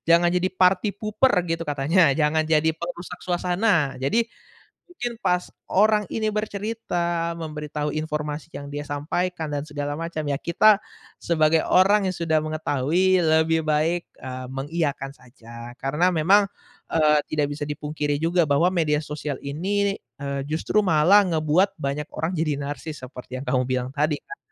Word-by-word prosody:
jangan 175 0 +3
jadi 180 +1 +2
party 185 +3 +4
pooper 215 +4 +2
gitu 165 -1 -2
katanya, 145 +5 +1 0.2
jangan 155 0 +2
jadi 155 +1 +3
perusak 175 +2 -7
suasana. 175 -4 +1
Jadi, 225 - +2 0.6
mungkin 240 -10 -5
pas 180 -5 0 0.2
orang 210 +1 +3
ini 220 -1 0
bercerita 200 -5 -2
memberitahu 150 -2 -4
informasi 150 0 -4
yang 140 0 -7
dia 145 0 -4
sampaikan 160 +3 -2
dan 145 - -2
segala 145 -1 -4
macam, 165 -2 -4
ya 145 -2 -1
kita 200 +6 +4 0.4
sebagai 160 -1 +2
orang 195 +2 +4
yang 185 - -4
sudah 160 -2 +1
mengetahui, 155 +4 +1
lebih 160 0 +3
baik, 160 +3 +1
eee, 130 0 -7
mengiyakan 140 0 -2
saja, 120 -2 -12
karena 150 +7 +2
memang, 195 +6 +4 0.5
eee, 150 -2 +4
tidak 150 -2 0
bisa 145 - -5
dipungkiri 150 0 -2
juga 170 0 +3
bahwa 145 +5 +3
media 155 -4 +1
sosial 150 -1 -4
ini, 195 +8 -1 0.2
eee, 140 0 -3
justru 160 +7 +1
malah 180 +5 +5
ngebuat 170 +4 +2
banyak 140 +2 -3
orang 160 +3 -1
jadi 155 -2 0
narsis 145 +2 -6
seperti 125 0 -9
yang - - -8
kamu 125 0 +2
bilang 130 -1 -1
tadi 150 +1 +1
kan 415 - -10
160 Hz, 150 wpm, -24 LUFS, 145-180 Hz, 0.6 s, malah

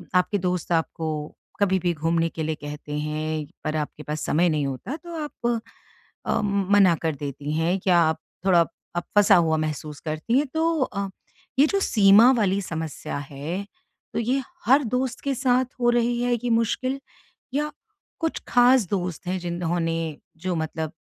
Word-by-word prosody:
आपके 180 +3 +3
दोस्त 180 -2 -2
आपको 160 -2 -2 0.2
कभी 190 -2 +3
भी 175 -1 0
घूमने 165 +2 +1
के 160 -1 -5
लिए 155 0 -1
कहते 150 0 -8
हैं, 155 0 -2 0.2
पर 155 0 -2
आपके 150 0 -4
पास 150 +1 -4
समय 170 +3 +3
नहीं 150 -3 0
होता। 135 - -4
तो 340 0 -9
आप 240 -5 -2 0.7
अ, - - +1
मना 200 -2 +4
कर 160 -2 0
देती 145 +1 -5
हैं 165 +4 +1
क्या 180 -1 +3
आप 160 -1 +2 0.3
थोड़ा, 180 -3 +6 0.3
आप 175 - -1
फंसा 205 -1 +7
हुआ 165 -3 +3
महसूस 155 -1 -3
करती 155 +11 -1
हैं। 290 - +3
तो 325 -2 +1
अ, 200 -5 -1 0.5
ये 290 - +8
जो 395 - +1
सीमा 215 - +6
वाली 200 -2 +2
समस्या 160 -6 -4
है, 165 +8 -4 0.5
तो - - 0
ये 250 +4 +1 0.2
हर 275 +3 +5
दोस्त 255 0 -1
के 275 -1 0
साथ 255 0 +2 0.2
हो 240 - +4
रही 240 0 +2
है, 245 0 +1
ये 240 +1 -3
मुश्किल? 235 +4 +1 0.6
या 300 +2 0 0.5
कुछ 325 -1 -1
ख़ास 245 -4 +5
दोस्त 180 -3 -2
हैं, 185 +1 -1
जिन्होंने, 165 -2 -2 0.2
जो 180 +2 -2
मतलब 160 0 -3
180 Hz, 170 wpm, -24 LUFS, 160-240 Hz, 0.7 s, ये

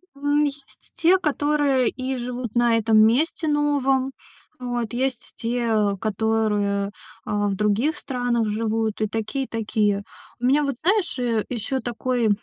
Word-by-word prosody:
М, 290 +1 +1
есть 280 -1 -8
те, 345 +2 +4
которые 290 -5 +1
и 260 0 -4
живут 245 -2 -5
на 235 -1 +4
этом 220 -1 +3
месте 260 +9 +3
новом. 275 -3 +1 0.5
Вот, 245 -2 -3
есть 255 -1 -2
те, 225 -4 0
которые, 210 -2 0 0.3
а, 205 0 0
в 195 - -1
других 215 - +1
странах 245 -6 -1
живут, 220 0 -1
и 215 - +2
такие, 225 +5 -3
и - - -15
такие. 210 -2 0 0.4
У 245 - -2
меня 285 +3 +4
вот, 280 -2 -1
знаешь, 370 -2 +1
э, 230 -3 0
ещё 250 +3 -2
такой, 240 -1 -1
240 Hz, 145 wpm, -23 LUFS, 220-275 Hz, 0.5 s, те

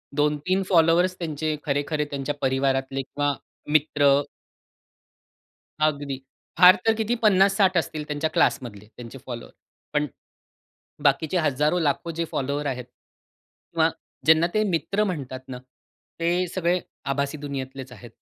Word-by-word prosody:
2-3 150 +6 +1
followers 175 +1 +4
त्यांचे 155 -2 -2
खरे-खरे 150 +1 0
त्यांच्या 145 0 -4
परिवारातले 135 0 0
किंवा 145 +1 -1 0.4
मित्र 150 -1 +3 1.8
अगदी. 145 -2 -1 0.4
फार 180 +1 +9
तर 225 - +5
किती 225 +2 0
50-60 195 -1 +4
असतील 155 -2 -1
त्यांच्या 150 +1 -1
क्लासमधले 105 -5 0
त्यांचे 120 +2 -9
फॉलोवर. 120 -2 -7 0.4
पण 150 0 +1 1.0
बाकीचे 145 +5 +2
हजारो 150 +1 +1
लाखो 160 +1 0
जे 165 +1 -2
फॉलोअर्स 140 +2 -2
आहेत 125 -2 -3
किंवा 125 - -5 0.4
ज्यांना 160 +2 +5
ते 215 - +3
मित्र 195 +5 0
म्हणतात 140 -9 -4
ना 125 - -6 0.6
ते 175 +2 +1
सगळे 180 0 0 0.2
आभासी 140 +2 -1
दुनियेतलेच 135 -2 -6
आहेत. 120 0 -12
150 Hz, 120 wpm, -24 LUFS, 135-170 Hz, 1.8 s, फार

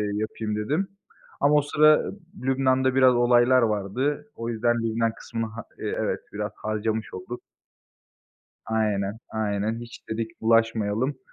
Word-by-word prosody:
yapayım 110 0 -3
dedim. 145 - -1 0.5
Ama 145 +1 +4
o 150 - +6
sıra 155 +1 +5 0.4
Lübnan'da 130 0 +2
biraz 130 -1 +6
olaylar 120 +1 +5
vardı. 125 +8 -1
O 115 0 -4
yüzden 120 +1 +1
Lübnan 115 0 0
kısmını 115 -1 -4
ha 115 0 -7 0.2
İii, - - -3
evet, - - -1
biraz 105 0 -3
harcamış 110 0 -2
olduk. 105 +7 -7 1.3
Aynen, 105 -2 0
aynen. 110 +1 -1
"Hiç" 120 0 -11
dedik, 110 0 -4
"bulaşmayalım." 115 +3 +2
115 Hz, 125 wpm, -25 LUFS, 110-130 Hz, 1.3 s, o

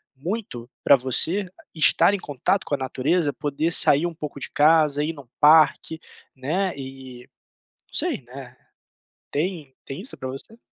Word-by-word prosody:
muito 140 - -6
pra 140 - +7
você 160 +10 +1 0.3
estar 160 +5 +4
em - - 0
contato 150 +5 -1
com 145 - -1
a - - -5
natureza? 145 +4 0
Poder 150 +3 -2
sair 150 +1 +5
um 170 - -3
pouco 150 -3 -8
de - - -4
casa, 150 -1 +3
ir 155 - -2
em 160 - -13
um 125 - -23
parque, 160 +1 +4 0.4
né, 175 +8 -2
e 130 -2 -10 0.6
não - - -27
sei, - - -1
né. 130 0 -12 0.7
Tem 155 -4 -3
tem 135 +5 -7
isso 235 - -3
pra 130 - -6
você? 135 - -8
145 Hz, 160 wpm, -23 LUFS, 130-165 Hz, 0.7 s, pra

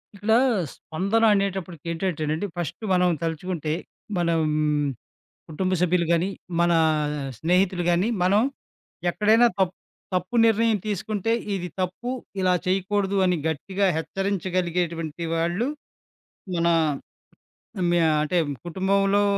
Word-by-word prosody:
ఇక్కడ 205 +2 -2 0.4
స్పందన 200 +8 -1
అనేేటప్పటికి 190 -5 -2
ఏంటంటేనండి, 165 0 -2
ఫస్టు 175 +5 -4
మనం 180 0 +4
తలుచుకుంటే 165 -1 -3 0.5
మనం 170 -2 +2 1.1
కుటుంబ 185 +4 -2
సభ్యులు 180 -1 +2
గానీ, 170 +3 +2 0.3
మనా 170 -1 +4 0.6
స్నేహితులు 180 +4 +2
గాని, 175 +5 +2
మనం 200 +4 +4 0.7
ఎక్కడైనా 220 +5 +4
తప్ 185 -2 +1 0.4
తప్పు 185 +6 -1
నిర్ణయం 225 -1 +3
తీసుకుంటే, 210 +1 -1 0.2
ఇది 180 -2 -3
తప్పు, 185 +7 -3 0.3
ఇలా 185 -1 +3
చేయకూడదు 195 +1 0
అని 180 -1 +2
గట్టిగా 190 +6 -1
హెచ్చరించగలిగేటువంటి 175 -3 -2
వాళ్ళు 170 +8 0 0.9
మనా 170 0 +3 1.1
హ్మ్. 175 -1 +2
యా 160 - +4
అంటే 165 +4 0 0.3
కుటుంబంలో 195 +3 +2
180 Hz, 100 wpm, -24 LUFS, 170-195 Hz, 1.1 s, మనం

